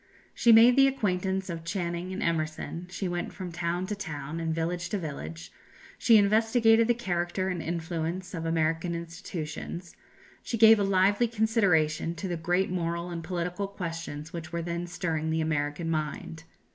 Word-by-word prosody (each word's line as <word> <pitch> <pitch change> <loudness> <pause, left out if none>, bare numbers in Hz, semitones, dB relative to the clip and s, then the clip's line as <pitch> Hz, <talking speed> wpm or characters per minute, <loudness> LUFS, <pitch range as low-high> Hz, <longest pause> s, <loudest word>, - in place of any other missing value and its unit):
She 235 - +4
made 230 +2 +8
the 275 0 +7
acquaintance 190 -6 -1
of 165 -3 -5
Channing 175 +1 -3
and 190 - -3
Emerson; 165 +1 -2
she 190 +1 -3
went 175 0 -3
from 185 -3 -6
town 170 +1 -2
to 210 - -3
town, 155 -5 -5
and 165 -1 -1
village 170 +2 -2
to 210 - -1
village; 80 - -6 0.5
she 230 - +6
investigated 225 +2 +4
the 240 - +3
character 185 -3 -1
and 180 -3 -2
influence 170 +2 -3
of 165 -3 -4
American 165 +1 0
institutions; 170 0 -6 0.5
she 230 - -3
gave 220 0 +8
a - - +2
lively 195 +4 +3
consideration 195 -8 +2
to 185 +4 -4
the 175 - -2
great 175 +3 0
moral 170 0 -2
and 170 -1 -5
political 180 +3 -3
questions 165 -4 -6
which 160 -2 -6
were 170 0 -2
then 170 +1 -3
stirring 165 -3 -2
the 160 0 0
American 155 +1 -1
mind. 160 +1 -3
175 Hz, 165 wpm, -28 LUFS, 165-195 Hz, 0.5 s, made